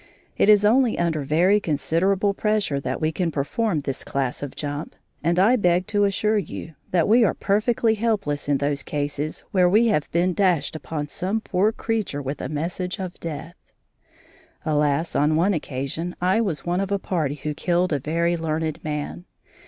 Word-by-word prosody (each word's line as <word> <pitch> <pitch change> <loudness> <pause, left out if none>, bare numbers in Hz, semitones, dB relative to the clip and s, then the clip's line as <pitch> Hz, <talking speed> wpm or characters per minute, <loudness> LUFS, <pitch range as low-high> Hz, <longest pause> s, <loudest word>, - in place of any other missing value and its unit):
It - - +3
is 210 -1 +6
only 240 +2 +4
under 165 -3 0
very 170 +9 +3
considerable 190 +5 +1
pressure 210 -9 0
that - - -3
we 155 0 0
can 175 +1 -1
perform 160 +4 -1
this 135 -2 -4
class 135 -2 -2
of 145 -2 -6
jump, 145 0 -5 0.3
and 170 +2 +1
I 205 +7 +5
beg 180 -3 +2
to 205 -1 +3
assure 210 +2 +1
you 165 -2 -7 0.2
that 175 -3 +2
we 230 +3 +5
are 210 - +2
perfectly 220 +2 +1
helpless 205 -11 -1
in 145 - +3
those 140 0 -1
cases 145 +1 -3
where 180 -2 +4
we 225 +5 +4
have 150 -9 0
been 175 +2 +2
dashed 180 -5 +1
upon 155 -1 -4
some 190 +8 -1
poor 210 0 +1
creature 220 -9 -2
with 140 0 -4
a - - -4
message 175 +5 -3
of 185 -3 -6
death. 165 +1 -6 1.1
Alas! 150 +1 +1
on 150 +2 +3
one 180 +6 +3
occasion 155 +3 -4
I 185 +5 +2
was 165 -11 -2
one 175 +1 0
of 195 0 -3
a 200 - +2
party 160 -7 -2
who 150 +1 -4
killed 175 +3 0
a 145 - +1
very 170 +5 0
learned 160 -1 -2
man. 150 +3 -4
170 Hz, 180 wpm, -23 LUFS, 150-200 Hz, 1.1 s, is